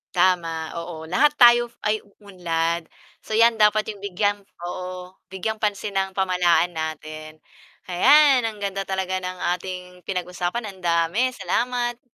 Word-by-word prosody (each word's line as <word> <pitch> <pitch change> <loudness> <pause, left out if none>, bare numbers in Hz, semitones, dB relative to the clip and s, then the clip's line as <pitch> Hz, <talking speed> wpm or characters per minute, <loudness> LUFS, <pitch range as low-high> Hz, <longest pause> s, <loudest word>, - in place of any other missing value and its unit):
Tama, 170 -3 +1
oo, 165 -1 -7
lahat 290 - +2
tayo 240 -2 +6 0.2
ay 210 +1 +1 0.2
uunlad. 170 -3 -2 0.3
So 215 - -5
'yan 230 0 +4
dapat 215 +1 +3
'yung 205 - -12
bigyang 205 +1 -1 0.2
oo, 180 +1 -6 0.2
bigyang 215 +4 -4
pansin 205 -1 -2
ng 190 0 -3
pamahalaan 180 -2 +2
natin. 155 -1 -6 0.4
Hayan, 270 +8 +5
ang 220 -2 -3
ganda 195 -1 -3
talaga 190 -1 -2
ng 185 0 -5 0.2
ating 180 0 -7 0.2
pinag-usapan, 180 +3 -3
ang 195 -2 -10
dami. 170 +9 +1
Salamat. 240 +5 -1
185 Hz, 135 wpm, -23 LUFS, 175-215 Hz, 0.4 s, tayo